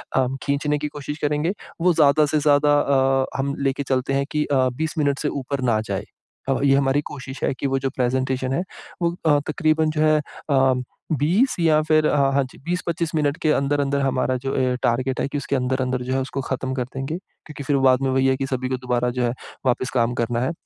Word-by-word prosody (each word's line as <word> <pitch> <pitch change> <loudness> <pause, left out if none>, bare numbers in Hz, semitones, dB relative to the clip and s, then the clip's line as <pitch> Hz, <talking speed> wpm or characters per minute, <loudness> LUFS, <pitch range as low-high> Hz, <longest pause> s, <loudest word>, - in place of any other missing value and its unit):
अ, 130 -1 +3 0.2
खींचने 145 +1 0
की 150 +1 -3
कोशिश 145 +1 -6
करेंगे। 150 +4 0 0.3
वो 180 0 +4
ज़्यादा 150 -1 +4
से 150 +1 +1
ज़्यादा 145 0 +4
अ, 135 -1 +2
हम 140 +1 -1
लेके 140 0 0
चलते 130 0 -1
हैं 140 0 +1
कि 150 -1 0
अ, 130 -2 +2
20 160 +2 -3
मिनट 145 -2 +1
से 150 - -1 0.2
ऊपर 140 0 -3
ना 110 - +2
जाए - - -2 0.4
अ, 135 - +3
ये 135 -1 +5
हमारी 140 +1 +2
कोशिश 135 -2 -8
है - - +1
कि 140 - 0
वो 135 - 0
जो 135 - -1
प्रेजेंटेशन 130 0 -1
है 155 - 0 0.4
वो 170 0 +2
अ, 145 -2 +5
तकरीबन 155 0 +1
जो 155 - -1
है 155 0 +4 0.3
अ, 135 -2 +4 0.5
20 190 - +2
या 155 -2 +4
फिर 155 -1 +3
अ, - - +1 0.2
हाँ 140 0 +3
जी - - -16
20-25 170 -2 -2
मिनट 150 -1 +1
के 155 - +3
अंदर-अंदर 140 0 +1
हमारा 130 -1 +1
जो 135 - 0 0.2
अ, - - -1
टारगेट 130 +2 0
है - - 0
कि 145 - -4
उसके 140 0 -2
अंदर-अंदर 130 0 -1
जो 130 +1 -2
है 135 - +1
उसको 135 +1 -4
खत्म 130 0 -2
कर 125 - -1
देंगे। 135 +5 -3
क्योंकि 150 -6 -12
फिर 140 0 +1
बाद 130 0 +4
में 135 - +1
वही 130 0 +2
है, 130 - +3
कि 135 - -2
सभी 130 -1 -2
को 130 - -1
दोबारा 125 -1 0
जो 125 - +2
है 120 - +1 0.3
वापस 130 0 +1
काम 120 -1 +2
करना 120 +1 -1
है। 130 - 0
140 Hz, 225 wpm, -22 LUFS, 130-150 Hz, 0.5 s, ये